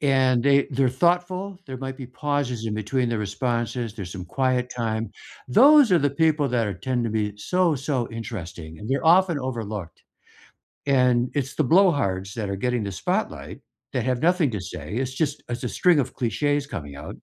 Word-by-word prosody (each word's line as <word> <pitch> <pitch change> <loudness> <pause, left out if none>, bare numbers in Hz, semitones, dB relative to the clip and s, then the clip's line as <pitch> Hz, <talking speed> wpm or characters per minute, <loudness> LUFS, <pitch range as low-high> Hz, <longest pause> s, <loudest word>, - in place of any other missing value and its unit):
And 130 -3 +3
they 140 +1 +4
they're 135 -1 +2
thoughtful, 180 +7 0
there 130 -2 -6
might 135 0 -5
be 130 - -8
pauses 130 -3 -2
in-between 110 +4 -1
their 115 -1 -1
responses, 115 +2 -2
there's 100 -5 -7
some 90 -1 -7
quiet 125 +4 0
time, 115 -3 -3 0.4
those 275 - +7
are 175 - +6
the 145 0 +2
people 150 0 +2
that 120 -3 +1
are 100 - -3
tend 120 +7 -2
to 115 - -1
be 105 -1 -2
so, 175 - +1
so 130 -3 -2
interesting, 90 -8 -7
and 105 - -7
they're 140 +4 0
often 175 -1 +5
overlooked. 110 - -5 0.8
And 125 -3 +3
it's 135 -3 -2
the 155 - +1
blowhards 125 - +2
that 105 -4 -3
are 100 - -2
getting 125 +3 -1
the 100 - -4
spotlight 90 - -3 0.3
that 125 - 0
have 125 -1 0
nothing 175 -4 +3
to 105 -4 -4
say, 95 +3 -7
it's 130 +1 -2
just 145 0 -1
it's 120 0 -4
a - - -1
string 180 -4 +3
of 135 - -4
cliches 145 +5 0
coming 75 - -7
out 75 +3 -8
125 Hz, 185 wpm, -24 LUFS, 110-145 Hz, 0.8 s, those